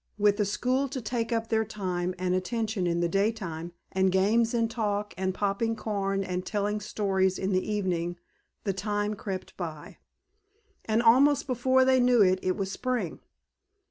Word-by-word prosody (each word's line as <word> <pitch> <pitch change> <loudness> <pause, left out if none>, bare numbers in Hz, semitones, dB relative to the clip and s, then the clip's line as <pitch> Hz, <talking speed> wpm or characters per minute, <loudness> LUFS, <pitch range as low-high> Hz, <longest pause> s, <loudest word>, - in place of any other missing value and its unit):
With 205 -1 +3
the 210 - +2
school 255 +7 0
to 265 0 -4
take 235 0 -2
up 225 -1 -1
their 220 0 +2
time 185 -4 -3
and 180 0 0
attention 210 0 -1
in 170 0 0
the 170 - +2
daytime 190 -4 -1 0.2
and 190 0 +2
games 215 +5 +3
and 230 -1 +2
talk 210 -2 -2
and 190 +1 -1
popping 205 +4 -1
corn 195 -3 -1
and 180 -1 -3
telling 210 +1 -1
stories 190 -3 0
in 190 +1 -1
the 185 +3 0
evening 175 -4 -1 0.5
the 195 - 0
time 205 +2 -1
crept 195 -2 -6
by, 160 -5 -7 0.9
and 220 +2 +1
almost 270 +5 +5
before 260 0 +3
they 260 0 +4
knew 245 -3 +5
it 185 0 +3
it 185 - 0
was 195 -2 -2
spring. 255 +3 -2
205 Hz, 170 wpm, -28 LUFS, 190-230 Hz, 0.9 s, almost